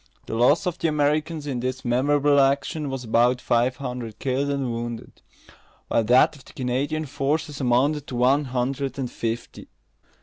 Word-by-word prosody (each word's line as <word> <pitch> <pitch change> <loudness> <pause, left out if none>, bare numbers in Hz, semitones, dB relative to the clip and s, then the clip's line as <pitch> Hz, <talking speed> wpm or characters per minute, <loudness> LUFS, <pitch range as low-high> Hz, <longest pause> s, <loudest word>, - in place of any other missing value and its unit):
The - - -6
loss 125 - +3
of 180 -2 -2
the 165 - +1
Americans 150 +1 0
in 135 -4 -3
this 130 +1 -4
memorable 140 +4 +3
action 140 +2 +1
was 135 -1 -4
about 120 +2 +2
five 125 +1 +1
hundred 125 -4 -6
killed 135 +1 -1
and 135 -3 -1
wounded; 115 0 -6 0.7
while 115 - +2
that 125 +6 +5
of 140 - -16
the - - -16
Canadian 135 +5 -2
forces 145 +2 -2
amounted 135 +4 +1
to 125 - -6
one 135 +4 +3
hundred 130 +2 -2
and 130 -3 -3
fifty. 115 +1 -5
135 Hz, 165 wpm, -24 LUFS, 125-145 Hz, 0.7 s, that